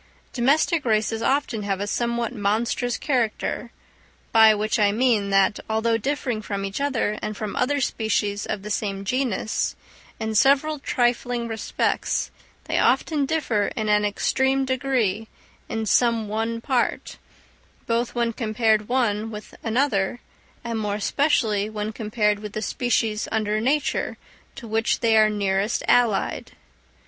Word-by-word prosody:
Domestic 295 +5 +2
races 220 -1 0
often 265 -4 0
have 200 -2 -2
a 205 - -2
somewhat 235 +2 -1
monstrous 230 +3 0
character; 245 -2 -1 0.6
by 220 -1 +7
which 215 +2 -1
I 205 -1 +4
mean, 220 -3 +2
that, 195 +1 +3
although 220 +1 +1
differing 245 -1 -2
from 200 -2 -4
each 195 +7 -4
other 240 -7 0
and 215 -1 -4
from 215 -2 -4
other 285 +3 +1
species 210 -5 -1
of 195 - -3
the 210 - -6
same 200 -2 -2
genus, 245 -2 -1 0.4
in 220 0 -2
several 280 +6 +3
trifling 245 -2 0
respects, 225 -1 -1 0.3
they - - -1
often 295 -4 +2
differ 245 -10 0
in 215 -1 -2
an 210 0 +3
extreme 265 +6 +1
degree 245 -6 0 0.4
in 225 0 -2
some 230 0 +2
one 225 +2 -2
part, 255 -2 -1 0.7
both 235 +1 -1
when 235 -1 0
compared 215 -2 +1
one 225 -4 0
with 210 -1 -9
another, 225 -3 0 0.4
and 230 -2 -3
more 205 -1 -1
especially 215 -3 +1
when 215 0 -4
compared 210 -2 0
with 210 -1 -8
the 215 - -3
species 225 -2 0
under 215 -1 0
nature 275 +4 0 0.4
to 235 - -9
which 225 +1 0
they 225 -1 +3
are 215 -1 +6
nearest 200 +1 0
allied. 235 -5 +1
225 Hz, 140 wpm, -24 LUFS, 210-245 Hz, 0.7 s, by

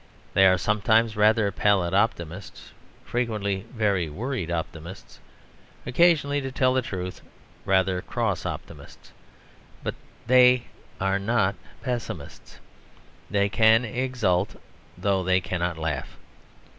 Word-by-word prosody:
They 95 0 +6
are 95 0 +4
sometimes 110 +4 +2
rather 105 0 +3
pallid 95 -3 +1
optimists, 95 -3 -2 0.3
frequently 105 -4 -2
very 100 -8 0
worried 110 - -4
optimists, 85 +2 -6 0.7
occasionally, 145 +1 +3
to 135 0 -5
tell 130 -1 +2
the 130 - +2
truth, 95 -7 -6 0.4
rather 95 -1 +2
cross - - -2
optimists: - - -8 0.7
but - - -2 0.3
they 125 0 +6 0.4
not 100 +2 +1 0.3
pessimists; 120 - -6 0.7
they 100 -1 +2
can 110 +3 +4
exult 110 -5 -1 0.4
though 95 -2 0
they 95 +1 +3
cannot 90 -2 -3
laugh. 80 -4 -4
100 Hz, 105 wpm, -25 LUFS, 95-120 Hz, 0.7 s, They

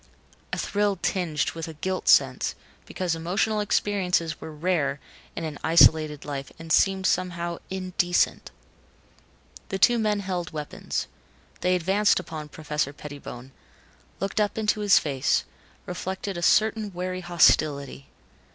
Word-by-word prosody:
A - - -2
thrill 205 -1 0
tinged 165 -7 -1
with 165 -1 -6
a 160 - -8
guilt 185 +4 -3
sense, - - +4 0.3
because 180 -3 -2
emotional 185 +6 0
experiences 185 -6 0
were 160 - -7
rare 150 -3 -1 0.4
in - - -4
an 155 -2 -5
isolated 155 -2 +5
life 140 -2 -5
and 165 0 -3
seemed 190 -1 +3
somehow 170 -2 -1
indecent. 185 -2 0 1.2
The 195 - -2
two 240 +4 +4
men 210 -2 +1
held 180 -3 -3
weapons. 150 -1 -4 0.5
They 180 0 +2
advanced 195 +4 +2
upon 155 -4 -7
Professor 150 -2 -3
Pettibone, 140 -4 -9 0.7
looked 195 +3 -2
up 205 +1 -1
into 215 -1 +1
his 205 -2 +5
face, 135 -4 +1 0.4
reflected 190 +2 -4
a 175 - -4
certain 215 +3 +2
wary 185 +1 -4
hostility. 150 -5 +2
175 Hz, 130 wpm, -25 LUFS, 155-195 Hz, 1.2 s, isolated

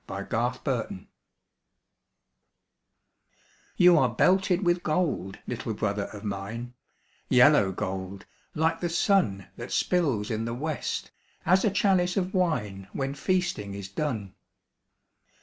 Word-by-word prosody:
THE - - -5
HOMING - - 0 0.3
BEE - - -10 2.7
You 175 -2 +7
are 130 - +3
belted 185 - +2
with 175 0 +2
gold, 155 - -1
little 115 -2 -4
brother 100 -1 -1
of 105 -2 -10
mine, 105 +4 -5 0.6
Yellow 95 -1 +6
gold, 95 0 -5 0.3
like 160 +2 +1
the 175 - -1
sun 165 - +1
That - - -7
spills 135 - +1
in 110 0 -2
the 115 0 -3
west, 155 +3 -3 0.3
as 185 +2 +4
a - - +4
chalice 190 -2 +2
of 185 0 -1
wine 105 - -1
When 135 0 -2
feasting 140 - -1
is 100 -1 -7
done. 105 -4 -3
130 Hz, 120 wpm, -27 LUFS, -, 2.7 s, You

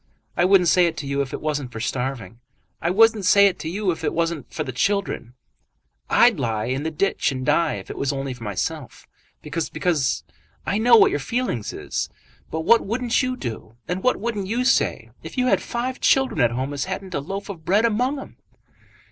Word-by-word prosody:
I 175 - +3
wouldn't 185 -2 +5
say 180 +1 +5
it 165 -1 -4
to 150 - -5
you 140 0 -1
if 135 -1 -4
it - - -5
wasn't 145 -5 -2
for 115 - -7
starving. 125 -1 -3 0.4
I 170 - 0
wouldn't 220 +2 +4
say 200 +2 +6
it 195 -3 +1
to 160 - -4
you 195 +2 0
if 165 - -6
it 150 - -1
wasn't 165 -5 -2
for 155 - -3
the 130 - -5
children. 195 - -1 0.7
I'd - - +5
lie 110 -2 -1
in 130 +3 -2
the 160 - -2
ditch 160 0 0
and 130 -1 -4
die 155 +1 +2
if - - -8
it - - -7
was 140 - 0
only 135 -1 -3
myself, 125 - -4 0.4
because 160 +2 -3
because 160 -7 0 0.4
I 200 - 0
know 235 +1 +6
what 215 - +6
your 145 - -1
feelings 145 - -2
is. - - -4 0.4
But 160 - -3
what 230 +8 +5
wouldn't 235 +4 0
you 255 -1 -2
do, 115 - -6
and 180 +1 -2
what 255 - +2
wouldn't 210 -3 -3
you 240 +5 -1
say, - - +1
if - - -10
you 250 - +2
had 255 - +3
five 250 +2 -3
children 265 - +3
at 120 - +4
home 130 +4 -3
as 140 - -2
hadn't 190 0 -5
a - - 0
loaf 195 +8 -5
of 180 -6 -8
bread 205 +7 +3
among 250 +6 +1
'em?" - - -11
170 Hz, 215 wpm, -23 LUFS, 135-210 Hz, 0.7 s, say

